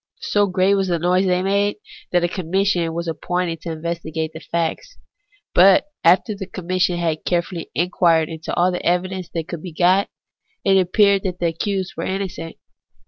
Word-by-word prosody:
So 205 -1 +2
great 185 +1 +2
was 195 -1 +1
the 175 -2 +1
noise 180 +3 +2
they 180 0 +1
made, 200 +1 +1 0.4
that 175 -1 +2
a - - +3
Commission 180 -1 0
was 170 0 -3
appointed 170 0 -2
to 170 - -6
investi 165 0 -4
gate 160 0 -2
the 160 - -7
facts; 170 - -3 0.6
but 195 +10 +6
after 180 +6 +4
the 195 -2 -7
Commission 180 -1 -1
had 165 -2 -1
carefully 175 -1 -2
inquired 165 -1 +2
into 160 0 -6
all 180 +1 +3
the 180 - -4
evidence 180 +1 -1
that 165 -1 -2
could 170 -3 -6
be 180 -2 -8
got, 185 +4 +3 0.6
it 195 - +4
appeared 200 +2 +3
that 185 -2 -3
the 175 - -2
accused 185 +3 -2
were - - -4
innocent. 190 -4 -4
180 Hz, 180 wpm, -21 LUFS, 170-190 Hz, 0.6 s, but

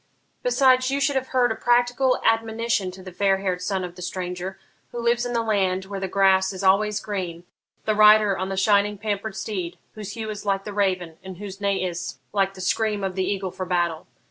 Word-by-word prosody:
Besides, 260 - +4
you 275 +1 0
should 280 0 +1
have 260 0 0
heard 250 -2 +2
a - - -1
practical 245 +2 +2
admonition 225 -3 +1
to 185 +1 -11
the 185 - -9
fair 195 +1 +2
haired 185 -2 -2
son 190 0 -1
of 180 -1 -7
the 180 - -10
stranger, 180 +1 -4 0.3
who - - -7
lives 235 +1 +1
in 245 - -4
the 230 -1 +1
land 190 -4 0
where 195 0 -5
the 190 - -2
grass 190 0 +3
is 190 +1 -6
always 205 +2 +3
green 180 -5 -4 0.4
the 215 - +2
rider 210 -1 +6
on 185 +1 -3
the 195 - -3
shining 205 +1 +3
pampered 205 0 -3
steed, 185 -6 -4 0.2
whose 205 -2 -7
hue 220 -1 -4
is 210 - -7
like 195 -1 0
the 210 - -6
raven, 185 -5 -1
and 190 -1 -8
whose 200 0 -8
neigh 200 -2 0
is 175 -6 -4 0.2
like 195 -1 +1
the 185 - -8
scream 210 +1 0
of 190 -1 -1
the 190 0 -1
eagle 195 -2 -3
for 185 - -5
battle. 175 -3 -1
200 Hz, 220 wpm, -24 LUFS, 185-220 Hz, 0.4 s, rider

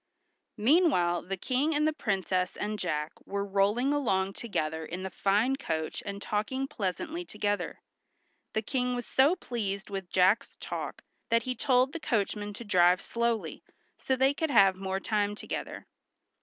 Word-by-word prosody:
Meanwhile 215 - +3
the 195 0 -2
King 275 - 0
and 300 +1 +3
the 310 - +1
Princess 190 - -1
and 210 0 -3
Jack 150 -4 -1
were 200 0 -3
rolling 205 +7 +2
along 195 -9 +1
together 160 -9 -2
in 180 +3 -6
the 190 - -4
fine 210 +9 +2
coach 160 - -3
and 200 0 -4
talking 240 +7 -2
pleasantly 305 - -3
together. 205 -8 -2 0.7
The 220 - 0
King 250 +1 -1
was 245 -1 -4
so 280 +7 +4
pleased 200 - -4
with 195 -2 -4
Jack's 185 +5 +3
talk - - -5 0.3
that 230 0 +3
he 255 - -1
told 255 +2 +2
the 330 - -4
coachman 210 -5 -1
to 220 - -8
drive 180 -3 +4
slowly, 235 0 -2 0.3
so 265 - 0
they 265 +2 +3
could 320 +2 -1
have 200 -7 +6
the 185 - -15
more 190 0 -1
time 205 0 0
together. - - -6
210 Hz, 160 wpm, -29 LUFS, 190-260 Hz, 0.7 s, have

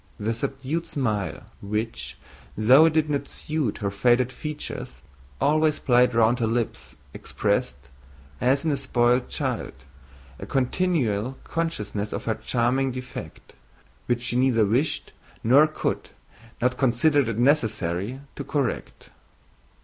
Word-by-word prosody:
The 110 +2 -1
subdued 135 +6 -3
smile 110 -8 -2 0.2
which, 100 - -4 0.4
though 130 +8 +7
it 165 - +3
did 155 -1 +2
not 140 -1 -2
suit 150 -8 -2
her 100 -1 -2
faded 120 +4 +2
features, 150 +2 -6 0.4
always 155 +1 +3
played 125 -2 +3
round 115 +2 +4
her 115 - +1
lips 110 - -3 0.2
expressed, 65 - -1 0.6
as 135 +4 +2
in 160 - +2
a 140 - 0
spoiled 120 0 +1
child, - - -2 0.7
a - - -7
continual 130 - 0
consciousness 105 -11 -3
of - - -4
her 115 - +1
charming 120 +4 0
defect, 125 0 -8 0.5
which 120 0 0
she 120 - -2
neither 125 -4 +3
wished, 125 +10 0 0.3
nor 135 +7 +6
could, 155 - -3 0.5
nor 125 +1 +3
considered 135 +1 +2
it 115 - -3
necessary, 110 - +1
to 140 - -5
correct. 140 -2 -3
125 Hz, 125 wpm, -25 LUFS, 110-140 Hz, 0.7 s, though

